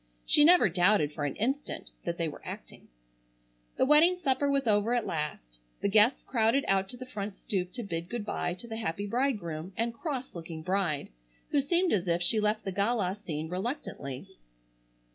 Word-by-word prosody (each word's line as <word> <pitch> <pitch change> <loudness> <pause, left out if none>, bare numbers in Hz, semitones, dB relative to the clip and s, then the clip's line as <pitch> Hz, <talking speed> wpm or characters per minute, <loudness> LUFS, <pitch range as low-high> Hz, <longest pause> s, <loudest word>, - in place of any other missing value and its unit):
She 295 - +5
never 350 -4 +7
doubted 175 -3 +3
for 145 - -3
an 140 - -2
instant 270 +7 -2
that 170 0 -2
they 165 - 0
were 150 - -8
acting. - - -9 0.9
The - - +4
wedding 315 +6 +6
supper 285 -4 +1
was 275 -1 +1
over 215 +2 +3
at 240 - 0
last. 135 - -4 0.2
The 200 - +2
guests 215 +5 +4
crowded 235 +3 +2
out 195 0 +2
to 245 - -5
the 255 - -7
front 205 -4 -5
stoop 180 -3 -3
to 240 - -5
bid 170 -3 -4
good 235 -3 -4
bye 175 -4 -2
to 235 - -9
the 225 -1 -5
happy 200 -2 -3
bridegroom 200 - -2
and 230 +1 0
cross 265 0 -4
looking 165 -2 -7
bride, 180 -5 0 0.4
who 285 - +3
seemed 345 +5 +2
as 185 -3 0
if 170 +1 +1
she 215 +5 +4
left 210 +1 0
the 195 - -2
gala 200 -1 0
scene 155 -3 -4
reluctantly. 180 - -5
205 Hz, 185 wpm, -29 LUFS, 170-245 Hz, 0.9 s, never